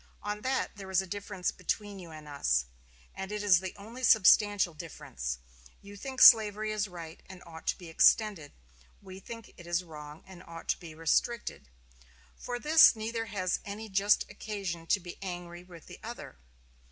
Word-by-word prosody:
On 210 0 -4
that 260 -3 -2
there 195 -1 -9
is 190 -1 +3
a - - -8
difference 200 -1 -3
between 200 +2 -4
you 175 -2 -10
and 155 -1 -11
us; 65 - 0 0.5
and 190 +1 -6
it 210 0 -3
is 190 -4 +6
the 190 -1 -6
only 230 +6 -10
substantial 205 -4 +5
difference. 65 - -6 0.4
You 200 0 -12
think 260 +5 0
slavery 215 -2 +7
is 210 0 -1
right 170 -3 -10
and 185 -1 -11
ought 160 -1 -12
to - - +1
be 175 - -11
extended; 165 -1 +3 0.5
we 190 -1 -11
think 230 +2 -10
it 175 - -12
is 175 +1 0
wrong 150 -2 -11
and 185 -2 -13
ought 165 -1 -11
to - - +1
be 165 -3 -10
restricted. 165 - -1 0.7
For 245 - -5
this 310 +2 +7
neither 225 +1 -3
has 185 -3 -1
any 215 +2 -7
just 200 +1 +3
occasion 190 -6 -5
to 200 - +3
be 175 -1 -10
angry 175 -2 -7
with 175 -3 -14
the - - -12
other. - - -8
190 Hz, 175 wpm, -30 LUFS, 170-210 Hz, 0.7 s, slavery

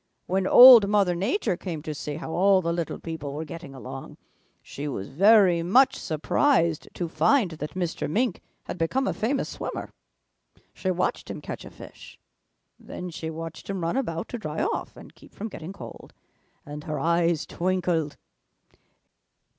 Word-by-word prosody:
When 190 +1 0
Old 245 -5 +10
Mother 200 -4 +3
Nature 200 - -1
came 170 -4 -6
to 155 - -4
see 145 0 -5
how 160 +1 -6
all 190 +2 +3
the 170 0 0
little 170 -1 -3
people 160 -4 -6
were 155 +2 -5
getting 155 -2 -9
along, 130 - -9 0.5
she 145 +2 -7
was 100 -8 -5
very 190 +2 +5
much 245 +11 +4
surprised 165 - +1
to 175 - -3
find 175 - +2
that 155 +1 -7
Mr. 175 -5 -3
Mink 230 +4 0 0.2
had 180 - -7
become 260 +12 0
a - - 0
famous 265 +5 -1
swimmer. - - -6 0.8
She 190 - -3
watched 180 0 -1
him - - -5
catch - - -7
a - - -9
fish. - - -13 0.6
Then 180 -1 -8
she 160 0 -5
watched 165 +2 -8
him 195 -2 -3
run 165 +5 -1
about 170 -11 -2
to 240 - -5
dry 155 - -3
off 440 +6 -3
and - - -13
keep - - -19
from 220 +3 -5
getting 165 -2 -8
cold, 195 - -11 0.5
and 150 +1 -8
her 150 -2 -3
eyes 170 +1 +1
twinkled. 175 -4 -1
170 Hz, 165 wpm, -25 LUFS, 160-200 Hz, 0.8 s, Old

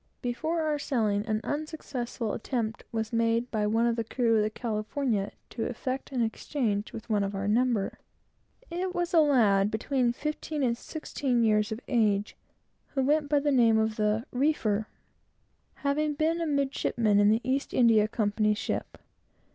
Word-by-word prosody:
Before 285 +8 -1
our 305 -2 0
sailing, 220 -7 0
an 215 -1 0
unsuccessful 275 -7 -4
attempt 230 -2 -3
was 220 0 -3
made 230 +1 +1
by 210 -2 0
one 225 +2 +2
of 235 -1 +2
the 230 - -1
crew 230 0 +1
of 215 - +4
the 210 - +1
California 220 0 -2 0.2
to 225 - -3
effect 255 +3 -4
an 250 -3 +1
exchange 220 -2 -2
with 225 - -8
one 210 -3 +1
of 200 0 -3
our 195 +1 -2
number. 230 -1 +1 0.7
It 365 +2 -3
was 350 0 -1
a 335 - +6
lad, 215 -10 +4
between 240 +3 0
fifteen 300 +2 -3
and 235 -2 +2
sixteen 255 -3 -2
years 210 -1 +2
of 220 +3 -4
age, 210 -4 +1 0.6
who 270 - +2
went 295 +2 +2
by 290 -1 +3
the 290 0 +1
name 230 -4 +5
of 220 0 +1
the 215 +2 +1
"reefer," 235 -6 +1 0.9
having 295 +1 0
been 320 +3 +1
a 330 - -1
midshipman 265 -7 +1
in 205 +1 +5
an 225 - 0
East 270 +2 -1
India 225 -4 +4
Company's 210 -1 +1
ship. - - -3
235 Hz, 165 wpm, -28 LUFS, 215-280 Hz, 0.9 s, a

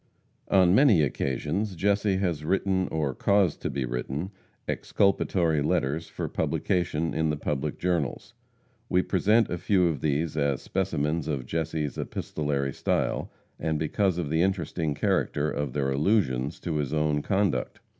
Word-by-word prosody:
On 90 -2 +5
many 110 - +6
occasions 75 - -1
Jesse 100 +2 +1
has 85 -6 -1
written, 95 +2 +1
or 75 -4 -1
caused 100 +5 +2
to - - -2
be 70 -1 -2
written, 65 +9 -3 0.4
exculpatory 85 -5 +1
letters 75 +2 0
for - - -4
publication 85 -3 -1
in 80 +1 +1
the 75 - -1
public 75 0 -2
journals. 85 - -2 0.6
We 90 0 +3
present 105 +4 +2
a 90 - -2
few 95 -2 +3
of 80 -6 0
these 75 +1 0
as 70 -3 +1
specimens 80 -4 -1
of 70 -5 -2
Jesse's 80 -2 -2
epistolary 70 -3 -2
style, - - -1 0.3
and 80 -1 -1
because 90 +4 0
of 80 -5 -2
the 80 +1 +2
interesting 85 -5 -1
character 75 +1 0
of 75 -4 -3
their 70 -1 0
allusions 70 - +1
to 80 -3 -2
his 75 -1 -2
own 75 -1 +1
conduct. 95 +2 0
80 Hz, 145 wpm, -27 LUFS, 75-95 Hz, 0.6 s, many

